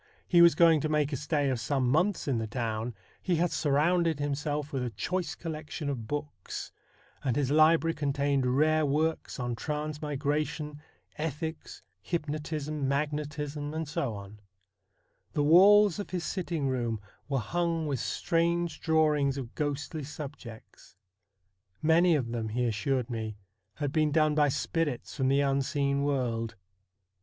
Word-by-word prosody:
he 175 -2 +5
was 170 -1 +7
going 165 -3 +5
to 155 - -1
make 150 -1 +1
a - - +1
stay 145 +1 0
of 125 - -1
some 130 +2 0
months 175 +9 +1
in 130 -5 +1
the 110 - -3
town, 115 -1 -3 0.3
he 180 - +1
had 170 +1 +1
surrounded 160 +2 +2
himself 145 +1 -2
with 130 -2 -1
a 125 - -1
choice 165 - -3
collection 155 -2 -5
of 120 -6 -4
books; 145 -9 -5 0.5
and 130 -4 0
his 140 -2 0
library 165 +2 +5
contained 140 -3 0
rare 155 +1 +3
works 155 +1 0
on 120 -1 -2
transmigration, 150 +1 -3 0.4
ethics, 160 - -4 0.2
hypnotism, 150 - -3
magnetism, 150 +1 -2
&c. 145 - -3 1.3
The 145 - +1
walls 200 +5 +6
of 205 - -5
his 180 -2 -3
sitting 170 -7 -2
room 120 -4 -1 0.3
were 135 - +1
hung 165 +5 -1
with 140 -4 -1
strange 170 +2 0
drawings 150 -4 +2
of 125 -4 -6
ghostly 145 +1 -3
subjects. 135 -9 -10 0.8
Many 165 +2 +4
of 125 -6 -1
them, 115 -2 -2
he 120 +3 0
assured 120 +3 -1
me, 110 -2 -4 0.4
had 145 -3 -2
been 155 0 +2
done 155 0 +3
by 150 -1 +3
spirits 145 -1 -2
from 130 -2 +1
the 135 +1 +3
unseen 140 0 +1
world. 120 -5 -1
145 Hz, 140 wpm, -29 LUFS, 135-160 Hz, 1.3 s, was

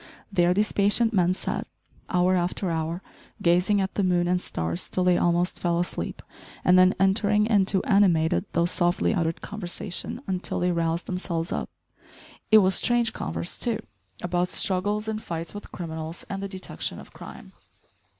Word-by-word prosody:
There 175 -3 +3
these 205 +3 +1
patient 210 +3 +2
men 180 -2 +3
sat, - - -3 0.4
hour 180 +1 +3
after 180 +1 -1
hour, 165 +2 -3 0.4
gazing 180 +4 +3
at 190 -1 -1
the 200 - 0
moon 175 -1 +2
and 180 0 +1
stars 85 - -4
till 185 - 0
they 180 -1 +4
almost 175 +1 +1
fell 170 -1 0
asleep, 175 - -3 0.4
and 180 - +6
then 185 0 +6
entering 205 +2 +3
into 200 -3 +2
animated, 170 - +3
though 170 0 +2
softly 175 +3 +1
uttered, 165 -4 -1
conversation 200 +4 -5
until 185 -1 -2
they 180 0 +1
roused 170 0 -1
themselves 175 -2 -3
up. - - -3 0.8
It 220 - +8
was 190 - +4
strange 235 +2 +3
converse 85 +1 -4
too, 235 -3 +1 0.5
about 175 0 0
struggles 205 +4 0
and 220 0 -3
fights 165 -3 -5
with 205 - -9
criminals 160 -1 -6
and 195 0 -3
the 200 - -3
detection 190 -1 -5
of - - -14
crime. - - -11
180 Hz, 160 wpm, -25 LUFS, 170-200 Hz, 0.8 s, It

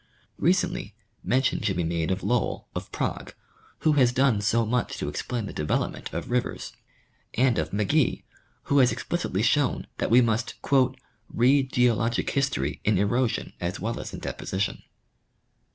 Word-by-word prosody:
Recently, 165 - +1 0.3
mention 130 +1 +1
should 100 -5 0
be 90 - +1
made 85 0 -1
of 95 +1 -1
Lowl, 120 -3 0
of - - -6
Prague, - - -3 0.5
who 155 - +4
has 130 -5 +4
done 125 -4 +2
so 115 +2 +2
much 120 +2 -1
to - - -3
explain 120 -4 -3
the - - -7
development 75 - -2
of 85 +8 -5
rivers, 125 0 -2 0.6
and 125 -3 +3
of 80 0 -1
McGee, 105 - +1 0.4
who 140 - +2
has 125 -2 +5
explicitly 110 - -2
shown 130 +3 +2
that - - 0
we 120 - +7
must 115 -1 +1 0.7
"read 130 +3 +3
geologic 120 -1 +2
history 105 - -1
in 105 -2 +2
erosion 115 +5 0
as 90 +2 -3
well 115 +2 -3
as - - -6
in - - -7
deposition." 95 +1 -3
115 Hz, 150 wpm, -26 LUFS, 100-130 Hz, 0.7 s, we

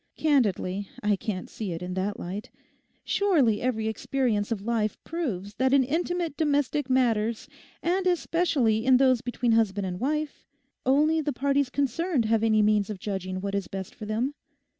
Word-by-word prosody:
Candidly, 205 - +1
I 210 0 +3
can't 190 -2 -4
see 205 -6 -5
it 165 +2 -6
in 180 0 -4
that 190 +2 -2
light. 195 +4 -6 0.5
Surely 295 - +2
every 220 -3 -1
experience 220 -1 -1
of 205 -3 -2
life 225 -2 0
proves 210 - -4
that 260 +1 +2
in 275 -1 +6
intimate 335 +3 -1
domestic 290 -2 0
matters, 230 -3 +1 0.4
and 370 +2 +1
especially 325 -11 +1
in 255 0 +5
those 255 -2 +4
between 245 0 -1
husband 210 -3 +2
and 180 -1 -4
wife, 300 +4 -2 0.4
only 305 +4 +3
the 295 -1 -1
parties 280 +1 +1
concerned 285 +1 0
have 220 0 +2
any 215 -1 +4
means 210 -1 +2
of 210 - -4
judging 185 -1 -4
what 200 0 -3
is 200 -2 -1
best 190 -1 -6
for 215 - -8
them? 235 +6 -1
235 Hz, 165 wpm, -27 LUFS, 205-285 Hz, 0.5 s, in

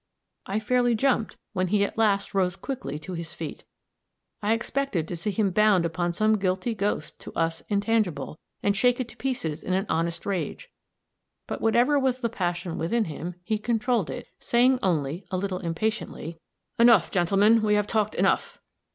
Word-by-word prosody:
I 200 +3 0
fairly 245 +2 +2
jumped, 245 -1 +1 0.2
when 185 -2 0
he 200 +2 +2
at 200 - -2
last 205 -3 +1
rose 185 -2 +1
quickly 245 - -5
to 170 +4 -8
his 165 -1 -6
feet; - - -7 0.8
I 210 +1 +2
expected 230 - -1
to 175 - -4
see 170 +5 -2
him 205 -1 +1
bound 205 -3 +4
upon 175 +1 -1
some 215 +4 +2
guilty 190 +4 0
ghost 200 -7 -2
to - - -8
us 165 0 -1
intangible, 200 -9 0 0.2
and 200 0 +2
shake 245 +4 +3
it 255 - -2
to - - -11
pieces 165 - -2
in 185 - -2
an 190 +2 +1
honest 170 +1 -1
rage; 200 - -3 0.7
but - - -5
whatever 240 +6 +3
was 260 -2 +1
the 235 - 0
passion 175 -5 -3
within 220 +8 +1
him, 170 +2 -6
he 215 +4 -1
controlled 230 -2 0
it, - - -6
saying 250 +2 +3
only, 170 - -1
a 185 - -1
little 185 -1 -2
impatiently, 170 -2 -3 0.4
"Enough, 230 -7 +6
gentlemen, 200 +5 +4
we 210 -1 +3
have 210 -1 +2
talked 215 -1 0
enough! - - +1
200 Hz, 175 wpm, -26 LUFS, 175-225 Hz, 0.8 s, Enough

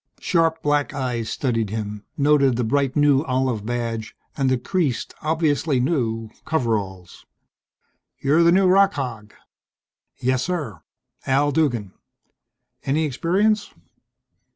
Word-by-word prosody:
Sharp 165 -2 +1
black 145 -1 +1
eyes 125 -5 -2
studied 115 -6 -1
him 105 -1 -5
noted 140 -3 +3
the 125 - -1
bright 135 +3 0
new 145 -2 +4
olive 130 -5 -1
badge, 115 -2 -3 0.2
and 135 -2 +1
the 130 - +2
creased, 140 0 -2
obviously 155 -3 +1
new, 115 -6 -1
coveralls. 105 - -3 0.9
"You're 145 +4 +2
the 170 0 +5
new 190 +2 +4
rock 195 +2 +5
hog?" 115 -7 -6 0.8
"Yes, 130 0 0
sir. 145 - -3 0.5
Al 140 +2 +2
Duggan." 120 - 0 0.9
"Any 155 +4 +1
experience?" 195 - 0
135 Hz, 115 wpm, -22 LUFS, 115-155 Hz, 0.9 s, the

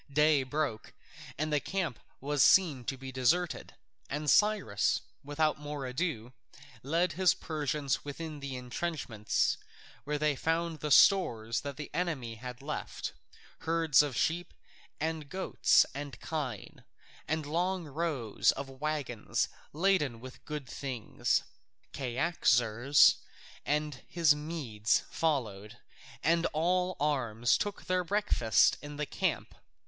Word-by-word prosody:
Day 150 0 +4
broke, 130 -4 -3 0.4
and 155 +1 -1
the 150 - +3
camp 175 -5 -3 0.2
was 145 +1 0
seen 150 -7 +5
to 135 - -3
be 130 0 -8
deserted, 145 +8 0 0.3
and 145 0 0
Cyrus, 205 - +2 0.2
without 150 +2 0
more 145 -2 -5
ado, 125 -3 -3 0.5
led 165 +7 +1
his 185 +1 +3
Persians 150 -3 -2
within 150 +1 -6
the 140 -2 -5
entrenchments, 125 -4 -1 0.5
where 150 +2 -2
they 150 -1 +1
found 165 +2 -1
the 150 - -3
stores 120 - +4
that 140 -1 -6
the 150 - -7
enemy 155 -10 -2
had 125 +3 -9
left: 150 +1 -5 0.5
herds 165 -3 +3
of 145 -5 -2
sheep 175 +2 -1 0.4
and 155 -1 -3
goats 190 +3 +3
and 140 -2 -7
kine, 135 - -5 0.4
and 155 0 -1
long 175 +4 -1
rows 145 -7 0
of 140 - -6
waggons 145 -7 -1 0.2
laden 155 -8 +1
with 130 +2 -11
good 150 -3 -5
things. 130 -3 -1 0.5
Cyaxares 125 -2 +3 0.5
and 150 -2 -1
his 165 -4 +4
Medes 150 -9 -1
followed, 115 -9 -2 0.5
and 170 +1 +3
all 180 +3 +1
arms 120 -6 +1
took 205 -1 -3
their 185 0 +1
breakfast 185 - +2
in 145 0 -8
the 150 - -1
camp. - - -2
150 Hz, 120 wpm, -31 LUFS, 130-165 Hz, 0.5 s, seen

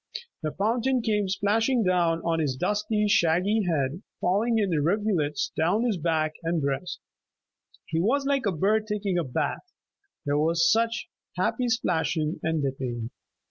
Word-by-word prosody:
The 155 -2 -2
fountain 235 - 0
came 210 -3 0
splashing 225 +5 +1
down 175 -3 +2
on 165 -1 0
his 145 -5 0
dusty, 210 - 0
shaggy 190 +3 +3
head, 150 +1 -1 0.2
falling 215 +6 +1
in 205 -4 +1
rivulets 165 -2 0
down 175 +8 +1
his 230 -6 0
back 155 -1 0
and 165 0 0
breast. 140 +4 -2 0.9
He 160 - -2
was 265 +10 +1
like 275 -5 +1
a - - +2
bird 210 +6 +1
taking 205 -4 -1
a - - 0
bath; 145 - -3 0.5
there 145 0 +1
was 165 +2 +3
such 230 +1 +1 0.3
happy 250 -2 0
splashing 165 -7 0
and 160 -2 -1
dipping. 125 -4 -3
180 Hz, 145 wpm, -26 LUFS, 160-220 Hz, 0.9 s, shaggy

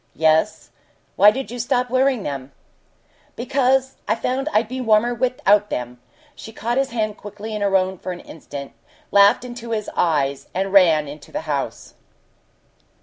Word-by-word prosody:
"Yes. 160 +5 +1 0.4
Why 205 - +7
did 260 +2 -4
you 245 - -6
stop 245 +1 0
wearing 260 -3 +2
them?" 140 -1 -5 0.8
"Because 265 +1 +1
I - - +2
found 260 +5 -2
I'd 215 +1 +2
be 255 +2 -5
warmer 225 +1 +3
without 215 -4 +2
them!" 125 0 -5 0.3
She 225 - -10
caught 235 +3 -2
his 270 - 0
hand 215 -3 -2
quickly 210 +2 -8
in 210 - -4
her 200 -1 +1
own 185 -1 -2
for 185 - -5
an 180 - -7
instant, 140 -3 -9 0.4
laughed 200 +4 +5
into 240 -1 -8
his 215 -2 -3
eyes, 140 -5 0
and 195 +1 -1
ran 165 -6 +5
into 145 0 -11
the - - -3
house. 145 -3 -4
210 Hz, 160 wpm, -21 LUFS, 165-245 Hz, 0.8 s, Why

